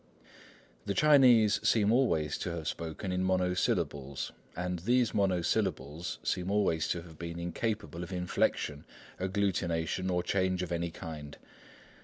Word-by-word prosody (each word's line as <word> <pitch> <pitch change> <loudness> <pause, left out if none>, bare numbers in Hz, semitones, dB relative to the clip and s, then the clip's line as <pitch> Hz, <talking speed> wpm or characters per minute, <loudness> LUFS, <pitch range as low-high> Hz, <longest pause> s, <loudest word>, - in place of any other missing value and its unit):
The 100 - -1
Chinese 130 -8 +6
seem 105 -2 +3
always 80 - +2
to - - -3
have 80 -2 -5
spoken 85 +4 -4
in 90 0 0
monosyllables, 90 -7 0 0.2
and 90 0 -2
these 120 +5 +2
monosyllables 85 -5 0
seem 90 +1 -1
always 95 -6 +1
to 85 - -2
have 80 -3 -14
been 85 0 -5
incapable 90 +1 -3
of 90 +1 -6
inflection, 90 -4 -1 0.4
agglutination, 95 -2 0
or 90 -1 +1
change 95 -1 0
of 90 - -5
any 85 0 -1
kind. 80 -4 -8
90 Hz, 130 wpm, -31 LUFS, 85-100 Hz, 0.4 s, Chinese